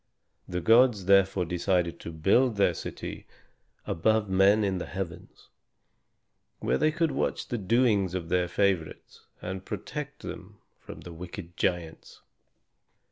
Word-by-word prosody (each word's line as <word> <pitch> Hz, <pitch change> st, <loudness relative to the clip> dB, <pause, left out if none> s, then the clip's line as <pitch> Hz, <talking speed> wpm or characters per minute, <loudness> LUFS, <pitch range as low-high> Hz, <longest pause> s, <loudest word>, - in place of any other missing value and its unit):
The 90 Hz, 0 st, -3 dB
gods 115 Hz, 0 st, +4 dB
therefore 95 Hz, -1 st, +4 dB
decided 90 Hz, 0 st, 0 dB
to 85 Hz, -, -7 dB
build 100 Hz, +10 st, +2 dB
their 100 Hz, -3 st, +3 dB
city -, -, -7 dB, 0.6 s
above 110 Hz, +5 st, +1 dB
men 95 Hz, +3 st, +4 dB
in 95 Hz, -2 st, 0 dB
the -, -, -5 dB
heavens, 90 Hz, -2 st, -7 dB, 1.1 s
where -, -, 0 dB
they 155 Hz, -, +3 dB
could 165 Hz, -1 st, 0 dB
watch -, -, -2 dB
the 120 Hz, -, -2 dB
doings 105 Hz, -3 st, +2 dB
of 85 Hz, -3 st, -4 dB
their 90 Hz, 0 st, +1 dB
favorites 90 Hz, -3 st, -2 dB, 0.2 s
and 95 Hz, +1 st, -5 dB
protect 150 Hz, -, -6 dB
them 105 Hz, +3 st, -8 dB, 0.2 s
from -, -, -11 dB
the 85 Hz, -, -10 dB
wicked 85 Hz, +1 st, -9 dB
giants. 85 Hz, -2 st, -3 dB
95 Hz, 135 wpm, -28 LUFS, 90-110 Hz, 1.1 s, gods